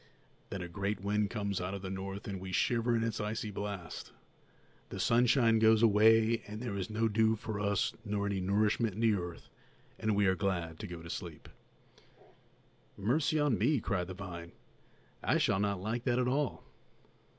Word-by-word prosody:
Then 95 -3 -4
a - - -5
great 100 +3 -3
wind 105 +1 0
comes 100 -4 -2
out 95 +2 -3
of 100 - -7
the 95 - -4
north, 95 +1 -5
and 100 -2 -4
we 95 0 -6
shiver 120 +4 +2
in 115 - +1
its 115 -2 -2
icy 105 0 -3
blast. 100 -4 -6 0.8
The - - -6
sunshine 115 -1 +4
goes 110 0 +5
away, 110 +1 +5
and 105 +1 -6
there 115 -4 -4
is 95 0 -3
no 110 +1 +1
dew 110 +1 +3
for 105 -1 -5
us 100 -1 +1
nor 100 -2 -1
any 100 -1 -1
nourishment 105 +2 +1
in - - -7
the 115 -2 +4
earth, 90 -3 -5 0.5
and 110 -1 +1
we 100 0 +3
are 95 - +4
glad 85 -4 -2
to 105 - -5
go 85 -2 -8
to 85 - -9
sleep." 85 -4 -7 1.5
"Mercy 145 +9 +1
on 145 -6 +2
me!" 130 +6 +3
cried 95 -5 -1
the 95 - -7
vine, 85 -3 -8 0.7
"I - - +2
shall 95 - +2
not 100 -2 0
like 110 +5 -3
that 120 -2 +2
at 125 -1 +1
all! 130 - 0
105 Hz, 185 wpm, -32 LUFS, 95-115 Hz, 1.5 s, goes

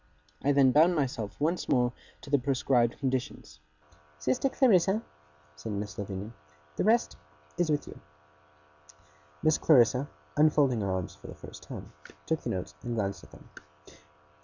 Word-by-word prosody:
I 145 - +3
then 135 -2 +5
bound 165 +6 +5
myself 125 -8 -2
once 165 +4 -1
more 125 -1 +2 0.3
to 140 - -11
the 145 - +4
prescribed 125 -2 +1
conditions. 130 - -3 0.6
'Sister 130 - 0
Clarissa,' 215 -5 +3 0.5
said 90 +9 -6
Miss 100 -1 -4
Lavinia, 100 +1 -5 0.4
'the - - 0
rest 225 +4 +2 0.4
is 175 -2 0
with 150 -1 0
you.' - - -10 1.4
Miss 155 0 +3
Clarissa, 130 -1 +4 0.3
unfolding 145 -6 +3
her 100 - -1
arms 95 -1 -2
for - - -14
the - - -9
first - - -11
time, - - -9 0.3
took 160 -1 -1
the - - -4
notes 90 -1 -4
and 120 -1 -4
glanced 100 -3 -2
at - - -15
them. - - -16
130 Hz, 150 wpm, -29 LUFS, 110-155 Hz, 1.4 s, then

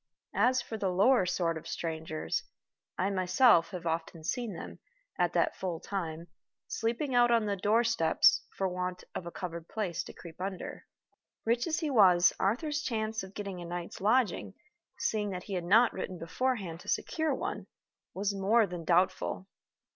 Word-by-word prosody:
As 255 0 +3
for 220 -2 -6
the 195 - 0
lower 195 +3 +4
sort 170 -2 0
of - - -13
strangers, 160 - -3 0.6
I 190 +2 +1
myself 185 -1 +4
have 180 -3 -7
often 165 0 -3
seen 230 +3 -2
them, - - -8 0.4
at - - +2
that - - +2
full 175 -3 -3
time, 170 -4 -4 0.4
sleeping 240 +5 -1
out 240 0 +5
on 230 -2 +3
the 205 -1 0
doorsteps 210 -3 +3 0.2
for 195 - +1
want 180 0 -3
of 175 - -5
a - - -5
covered 170 -3 -6
place 195 -7 -2
to - - -9
creep 170 0 -11
under. 190 -1 -5 0.6
Rich 235 +4 +1
as 330 +1 0
he 305 -3 -1
was, 185 -7 +6
Arthur's 295 - 0
chance 220 -5 -2
of 190 +1 -10
getting 195 -3 -5
a - - -6
night's 175 +1 -6
lodging 215 -2 +1 0.4
(seeing 210 -2 0
that 180 -2 -5
he 200 - -7
had 180 -2 -2
not 225 +7 +5
written 185 - -5
beforehand 180 0 -2
to - - -15
secure 315 -3 0
one) 390 +8 -4 0.5
was 200 +1 0
more 210 +4 +3
than 175 -3 -6
doubtful. 185 +2 +1
190 Hz, 170 wpm, -31 LUFS, 175-230 Hz, 0.6 s, was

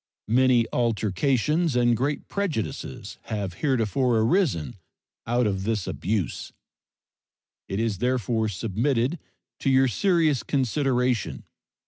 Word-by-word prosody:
Many 125 -2 +4
altercations 125 - +1
and 120 -1 +3
great 140 +5 -2
prejudices 185 - -4
have 100 -4 -3
heretofore 125 -2 +1
arisen 120 - +1 0.5
out 120 +1 +2
of 95 -2 -1
this 105 -2 -1
abuse. 90 - -3 1.2
It 95 - -3
is 110 -4 -1
therefore 120 -3 0
submitted 120 - -1 0.4
to - - 0
your 135 0 +4
serious 160 - +2
consideration. 130 -3 0
120 Hz, 100 wpm, -25 LUFS, 110-135 Hz, 1.2 s, Many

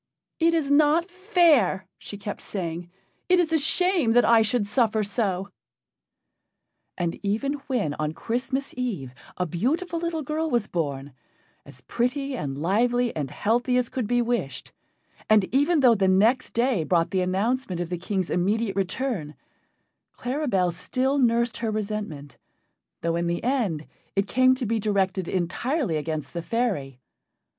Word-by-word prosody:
"It 335 0 +3
is 295 -4 0
not 310 +5 +4
fair," 350 - +3
she 205 - -8
kept 205 0 -6
saying, 175 -3 -4 0.4
"it 365 - +6
is 325 -2 +1
a 320 - +4
shame 340 -4 +2
that 245 - +5
I 230 -1 +6
should 220 0 +1
suffer 220 0 +1
so." 200 -2 -1 1.5
And 170 -2 -2
even 220 +8 -1
when 230 - 0
on 155 +1 -2
Christmas 260 - -3
Eve 200 - -3 0.2
a 180 - 0
beautiful 305 - -1
little 330 -2 -2
girl 315 +3 -2
was 240 -6 +1
born, 145 -7 -3 0.5
as - - -13
pretty 270 +3 -1
and 140 - -4
lively 235 +9 +1
and 145 -4 -3
healthy 245 - +1
as 250 -2 0
could 250 -5 -3
be 245 +1 +2
wished, 230 - -3 0.6
and 215 -2 +6
even 290 +4 +3
though 250 -3 +7
the 195 -3 +2
next 215 +7 +3
day 235 -6 +2
brought 165 0 +1
the 190 - +1
announcement 195 +2 -1
of 175 0 -4
the 175 - -2
King's 190 -1 -2
immediate 200 +3 0
return, 195 - -2 0.8
Claribel 245 - 0
still 260 +10 0
nursed 235 -1 +2
her 230 - -2
resentment, 205 - -4 0.6
though 165 0 0
in 170 0 -1
the 170 0 -2
end 220 - 0 0.3
it 195 0 +2
came 255 +2 +4
to 255 -1 -3
be 225 +1 0
directed 195 -3 0
entirely 195 - -1
against 155 -1 -3
the 170 - -3
fairy. 170 - -2
220 Hz, 150 wpm, -25 LUFS, 180-260 Hz, 1.5 s, though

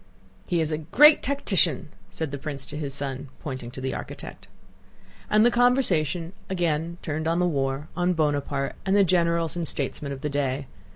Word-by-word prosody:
"He 175 -3 +1
is 160 0 -1
a 155 - -1
great 295 - +6
tactician!" 190 - +2 0.2
said 160 -4 -3
the 140 - -5
prince 140 -2 -4
to - - -6
his 145 -2 -3
son, 135 0 -3
pointing 130 -4 -6
to 125 - -9
the 130 0 -2
architect. - - -8 0.8
And 215 +1 +5
the 240 - +5
conversation 190 - +2 0.2
again 170 -2 -1
turned 155 0 -2
on 165 +1 +1
the 180 - +2
war, 135 -2 -1
on 180 0 +1
Bonaparte, 145 -3 -1
and 195 +1 +1
the 205 - +6
generals 170 -3 +1
and 170 -2 -2
statesmen 140 +1 -3
of 135 -1 -6
the 150 - -2
day. 140 -1 -1
155 Hz, 180 wpm, -25 LUFS, 140-175 Hz, 0.8 s, great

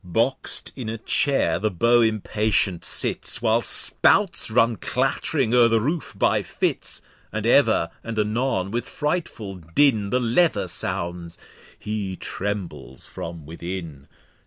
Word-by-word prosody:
Box'd 115 +9 +1
in 125 -5 -5
a 115 - -4
Chair 115 - +1
the 110 +3 0
Beau 115 +6 +3
impatient 105 -4 0
sits, - - +1
While 115 0 +2
Spouts 190 - +3
run 115 0 +2
clatt'ring 110 - -1
o'er 120 -1 +6
the 115 -1 +2
Roof 150 +8 -3
by - - +2
Fits; - - -2 0.3
And - - -3
ever 85 0 +3
and 115 -1 -6
anon 105 -2 0
with 120 +2 -3
frightful 150 - -3
Din 100 - +1
The 125 - +1
Leather 120 - +2
sounds, 85 -1 -4 0.4
he 105 -3 -4
trembles 85 -12 -5
from 85 -2 -8
within. 85 -3 -7
110 Hz, 130 wpm, -23 LUFS, 90-120 Hz, 0.4 s, o'er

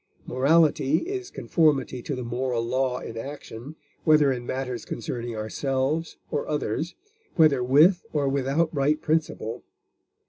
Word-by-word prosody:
Morality 150 +2 +3
is 380 -1 -4
conformity 140 - +1
to 140 - -4
the 125 - -5
moral 120 0 -1
law 130 +1 0
in 115 - -7
action, 135 +2 -8 0.3
whether 150 -3 +5
in 120 -2 -4
matters 130 -2 -3
concerning 120 0 -5
ourselves 135 +8 -2
or 145 - -2
others, 150 +2 -2 0.4
whether 150 -7 +4
with 155 +9 +5
or 145 -2 0
without 140 +4 +1
right 145 +1 +2
principle. 155 -7 -1
135 Hz, 130 wpm, -25 LUFS, 125-155 Hz, 0.4 s, whether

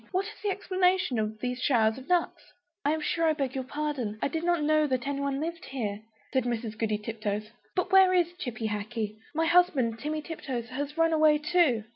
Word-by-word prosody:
What 380 +1 0
is 430 0 -10
the 420 - 0
explanation 370 - +1
of 215 0 -2
these 250 0 -2
showers 225 -3 +3
of 265 - -14
nuts?" 355 -2 0 0.3
"I 290 - +2
am 315 0 -1
sure 330 +2 +1
I 315 - +4
beg 275 -4 -2
your 265 - -2
pardon; 270 -6 -3
I - - 0
did 320 +3 -3
not 345 -3 +2
know 305 0 +3
that 255 -2 -1
anybody 280 -1 -1
lived 335 +3 -4
here," 215 -6 -4 0.3
said 260 -2 +2
Mrs. 230 -2 -2
Goody 215 -1 0
Tiptoes; 215 0 -4 0.2
"but 365 +1 0
where 380 -1 +7
is 350 -1 +2
Chippy 240 -8 -4
Hackee? 215 +1 -4 0.2
My 325 +1 +2
husband, 305 -10 +3
Timmy 305 +1 -3
Tiptoes, 255 -8 -5
has 285 +4 -4
run 330 0 +3
away 310 -1 +5
too." 300 -7 +2
280 Hz, 205 wpm, -28 LUFS, 230-330 Hz, 0.3 s, where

